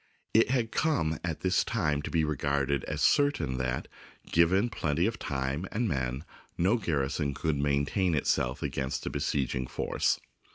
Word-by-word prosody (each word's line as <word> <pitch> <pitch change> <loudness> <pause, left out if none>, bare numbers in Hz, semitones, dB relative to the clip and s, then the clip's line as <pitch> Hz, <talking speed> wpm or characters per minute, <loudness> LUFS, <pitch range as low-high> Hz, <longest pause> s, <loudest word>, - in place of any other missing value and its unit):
It 115 +1 +5
had 120 -4 +1
come 100 - +1
at 85 -3 -3
this 95 0 +2
time 75 -10 0
to - - -5
be 80 -1 +1
regarded 70 -2 0
as 75 0 -2
cer 145 -1 +5
tain 75 - -3
that, 65 0 -2 0.4
given 90 +6 +4
plenty 80 -1 0
of 115 +2 -1
time 70 +5 -2
and 115 +2 0
men, 65 -1 -2 0.3
no 95 +8 +3
gar 80 -10 0
rison 70 0 -2
could 75 -1 -1
maintain 70 +5 +1
itself 65 -2 0
against 65 0 -2
a - - -2
besieging 65 -3 -1
force. - - 0
75 Hz, 165 wpm, -29 LUFS, 70-95 Hz, 0.4 s, It